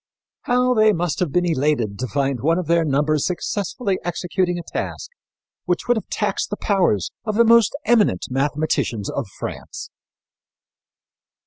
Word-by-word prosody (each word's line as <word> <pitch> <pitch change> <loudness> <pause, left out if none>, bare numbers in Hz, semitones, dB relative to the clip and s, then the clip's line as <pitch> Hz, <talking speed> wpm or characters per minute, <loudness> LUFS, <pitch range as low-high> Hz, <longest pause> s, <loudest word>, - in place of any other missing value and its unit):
How 250 0 +2
they 215 -2 +4
must 170 -4 -1
have 180 -6 0
been 175 +4 +2
elated 140 - 0
to 130 - -2
find 140 -1 -1
one 165 +4 +2
of 185 - -2
their 170 +1 +3
number 150 +1 +1
successfully 190 - -2
executing 175 +1 -1
a 175 - -5
task 170 - -5 0.5
which 180 -1 -1
would 245 - +4
have 220 - -4
taxed - - -1
the - - -4
powers 175 - +1
of 215 -2 -2
the 235 +1 +5
most 230 +1 +5
eminent 215 - +3
mathematicians 135 -6 -1
of 140 -6 -3
France! - - -7
175 Hz, 150 wpm, -21 LUFS, 140-205 Hz, 0.5 s, the